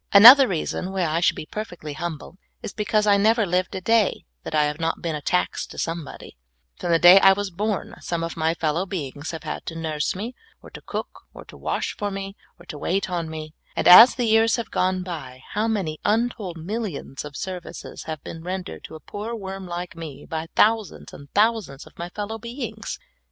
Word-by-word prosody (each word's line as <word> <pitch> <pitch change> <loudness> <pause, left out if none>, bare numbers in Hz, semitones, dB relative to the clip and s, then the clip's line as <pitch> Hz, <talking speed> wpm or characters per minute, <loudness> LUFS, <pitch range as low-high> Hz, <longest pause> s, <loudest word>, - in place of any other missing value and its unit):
Another 250 +7 +11
reason 180 +1 -3
why 190 -2 0
I 160 +1 0
should 175 - +3
be - - -6
perfectly 175 -7 -6
humble, 170 +2 -6 0.2
is - - -5
because 210 0 +1
I 205 -1 +5
never 220 +2 +3
lived 180 0 -1
a 185 - -4
da} 225 +1 +2 0.2
that - - -5
I 150 - +4
have 150 +1 -2
not 165 0 -1
been 165 -2 -1
a 150 - -4
tax 180 +5 0
to - - -12
somebod}^ 165 -2 -5 0.5
From 175 - -3
the 165 - +5
da)' 175 +3 +9
I 195 0 +7
was 200 0 -3
born 205 +1 -2
some 170 -1 -3
of 165 - -4
my 160 +1 0
fellow 165 +4 -1
beings 145 -5 -5
have 160 -2 -6
had - - -5
to 165 - -5
nurse 155 -1 -2
me, 220 +6 -5 0.3
or - - -15
to - - -10
cook, - - -6
or - - -11
to - - -14
wash - - -3
for 205 - -2
me, 195 0 -6 0.2
or 175 - -16
to 150 - -8
wait 190 +3 -1
on 170 -2 -2
me; 155 -1 -7 0.2
and - - 0
as 225 +8 +10
the 245 - 0
years 225 +1 +4
have 235 -3 -5
gone 185 0 0
by, 135 -8 -7
how 215 +2 0
many 190 -9 -2
untold 215 -5 0
millions 175 - -5
of 145 -1 -8
services 185 -3 -7
have 155 -2 -6
been 165 - -8
rendered 185 +1 -5
to - - -10
a - - -9
poor 210 +9 -6
worm 195 -3 -7
like 175 0 -5
me 160 -4 -8
by 160 -1 -4
thou 225 +1 +5
sands 205 - -12
and 140 0 -12
thousands 215 -10 +1
of - - -17
my 170 +1 -4
fellow 210 +4 -5
beings 235 +5 -6
180 Hz, 215 wpm, -23 LUFS, 160-210 Hz, 0.5 s, Another